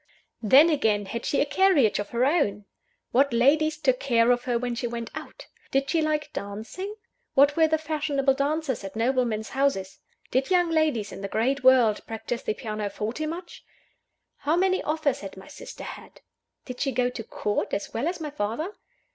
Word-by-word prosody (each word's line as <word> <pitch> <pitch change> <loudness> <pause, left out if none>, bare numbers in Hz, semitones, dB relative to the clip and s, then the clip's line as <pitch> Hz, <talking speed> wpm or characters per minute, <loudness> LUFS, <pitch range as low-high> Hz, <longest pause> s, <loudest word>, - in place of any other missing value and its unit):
Then, 275 +9 +6
again: 215 -9 +1
Had 230 +4 -5
she 280 - +1
a - - +3
carriage 295 - +3
of 205 - -4
her 240 +2 +1
own? 210 - +1 0.5
What 275 +2 +3
ladies 300 +6 +3
took 260 -5 +1
care 235 -3 +3
of 245 0 0
her 245 -2 +1
when 245 0 -2
she 240 +1 -2
went 235 -1 -5
out? - - -9 0.2
Did 275 0 0
she 330 - +2
like 305 -1 -1
dancing? 220 - -6 0.4
What 280 +2 +5
were 320 -1 +5
the 315 0 +2
fashionable 295 -3 0
dances 280 -3 -1
at 195 +1 -7
noblemen's 230 -2 0
houses? 260 -9 -1 0.3
Did 265 +1 +1
young 355 -2 +3
ladies 305 -10 +1
in - - -8
the 200 - -3
great 260 +7 0
world 250 -5 +5
practise 225 +2 -4
the 215 - -2
pianoforte 215 +7 -4
much? 340 +2 -7 0.7
How 305 +3 0
many 375 +1 +2
offers 305 -3 0
had 195 -1 -9
my 190 - -12
sister - - -10
had? - - -10 0.4
Did 250 -1 -8
she 275 - 0
go 250 0 +1
to 230 - -6
Court, 210 -1 -2
as 200 - -3
well 240 +7 -1
as 350 +1 -2
my 305 -2 -5
father? 280 - -3
265 Hz, 185 wpm, -26 LUFS, 225-310 Hz, 0.7 s, Then